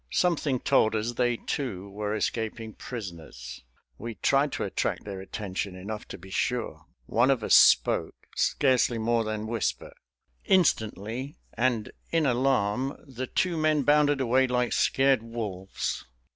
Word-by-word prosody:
Something 150 -7 +1
told 110 -1 +3
us 110 +2 -1
they, 120 -1 +1
too, 105 -10 -4
were 105 +1 -3
escaping 110 0 -3
prisoners. 80 - -8 0.4
We 115 0 -6
tried 140 +5 +2
to - - -2
attract - - -2
their 100 -2 -6
attention 95 -1 -4
enough 105 +4 -6
to - - -8
be 95 +1 -13
sure. 100 -8 -2 0.2
One 120 - +2
of 130 -5 +2
us - - +2
spoke, - - +5 0.2
scarcely 130 -3 +2
more 115 +1 +1
than 110 0 -3
whisper. 115 -1 -2 0.5
Instantly 130 - 0 0.2
and 115 -2 0 0.2
in 165 -2 +1
alarm 130 -1 +1
the 130 -1 -5
two 180 +5 0
men 155 -2 +2
bounded 145 0 +4
away 130 +1 +3
like 125 -1 0
scared 135 -3 +3
wolves. 105 -5 -4
115 Hz, 140 wpm, -27 LUFS, 105-135 Hz, 0.5 s, spoke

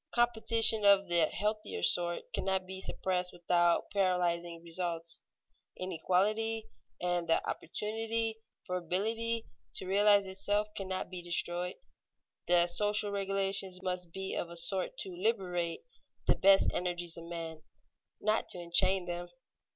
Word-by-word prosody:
Competition 230 -2 +4
of 200 -2 +5
the 170 -2 +5
healthier 210 - -2
sort 175 - +1
cannot 190 -1 0
be 190 0 -7
suppressed 180 -1 -1
without 175 0 +1
paralyzing 175 -3 0
results. 170 -1 -4 0.6
Inequality 205 +5 0 0.3
and 175 -1 -1
the 165 - +2
opportunity 225 +4 -3 0.3
for 180 -2 -2
ability 225 +6 -1 0.3
to - - -1
realize 200 +1 +4
itself 205 +2 -1
cannot 190 -2 -3
be 180 -1 -5
destroyed. 175 +1 -1 0.7
The 175 -1 +6
social 205 +3 +1
regulations 195 -1 0
must 180 -2 -3
be 190 +2 -5
of 170 - -3
a 170 - -9
sort 175 +3 +3
to 190 - -5
liberate 180 -4 -1 0.4
the - - +4
best 195 0 +5
energies 175 -1 -1
of 170 - -9
men, 165 -2 -6 0.6
not 215 +1 0
to 180 - 0
enchain 180 +2 +3
them. 175 0 -5
185 Hz, 130 wpm, -32 LUFS, 175-205 Hz, 0.7 s, The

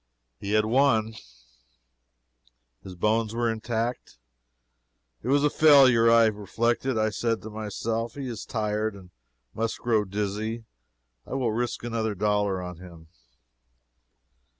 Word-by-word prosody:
He 100 - -4
had 110 0 +3
won. 115 -2 +2 1.7
His 95 -1 -10
bones 110 +4 0
were 120 -1 +1
intact. 115 - -4 1.0
It - - -8
was 140 +2 +3
a 150 - +4
failure. 130 -7 +6
I 115 0 +6
reflected. 115 +4 -1
I 110 0 +1
said 115 +1 -2
to 110 - -8
myself, 110 +2 -3
he 140 -2 -5
is 115 -3 -6
tired, 105 -1 -2
and 90 -2 -14 0.4
must 115 0 -2
grow 110 -3 +1
dizzy. 105 +3 -3 0.6
I - - -5
will 125 -4 0
risk 120 +2 -3
another 115 -3 -2
dollar 105 -2 0
on 90 -1 -7
him. 85 -3 -13
110 Hz, 125 wpm, -26 LUFS, 105-120 Hz, 1.7 s, failure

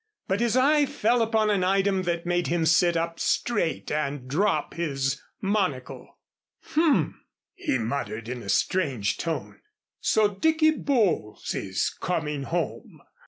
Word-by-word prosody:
But 190 +2 0
his 235 +1 +2
eye 290 +2 +4
fell 235 +1 +1
upon 220 -1 +2
an 195 -3 +1
item 195 +1 +2
that 170 0 -2
made 175 0 0
him 170 -1 +1
sit 170 +1 +4
up 165 0 -2
straight 205 -9 0
and 145 -3 -2
drop 190 +10 0
his 140 -4 -2 0.2
monocle. 185 -11 -2 0.5
"H - - -11
m!" 320 -3 +2 0.3
he - - -1
muttered 115 -1 -3
in 125 0 -5
a 100 - -8
strange 135 - +1
tone. 165 -2 -4 0.4
"So 215 -1 +3
Dicky 315 +9 +3
Bowles 215 - 0
is 95 -1 -1
coming 150 -5 -3
home!" 165 -2 -4
175 Hz, 140 wpm, -26 LUFS, 140-215 Hz, 0.5 s, eye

